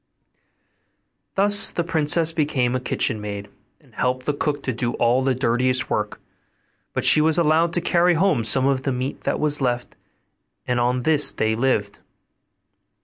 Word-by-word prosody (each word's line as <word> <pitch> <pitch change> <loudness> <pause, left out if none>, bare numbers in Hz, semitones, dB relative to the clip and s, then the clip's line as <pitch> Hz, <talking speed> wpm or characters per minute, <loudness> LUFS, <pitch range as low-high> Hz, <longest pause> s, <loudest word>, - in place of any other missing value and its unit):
Thus 205 +1 +4
the 170 - -3
princess 165 0 +1
became 145 -6 -1
a - - -1
kitchen 115 -3 -2
maid, 100 -1 -7 0.3
and - - -26
helped 130 0 -2
the 150 - -1
cook 145 0 -3
to 130 - -2
do 120 +1 -3
all 120 +2 +1
the 130 -1 0
dirtiest 130 +1 -1
work; 105 -1 -3 0.7
but - - -1
she 155 - +6
was 160 +1 +3
allowed 165 0 +2
to 175 - 0
carry 175 +1 +2
home 160 -8 +1
some 130 +4 +3
of 135 -1 0
the 135 - -2
meat 130 +2 -5
that - - -1
was 150 -1 +2
left, 120 -2 -2 0.7
and 125 -1 -1
on 125 +1 0
this 150 0 +3
they 110 0 -1
lived. 110 -5 -1
130 Hz, 165 wpm, -21 LUFS, 120-155 Hz, 0.7 s, she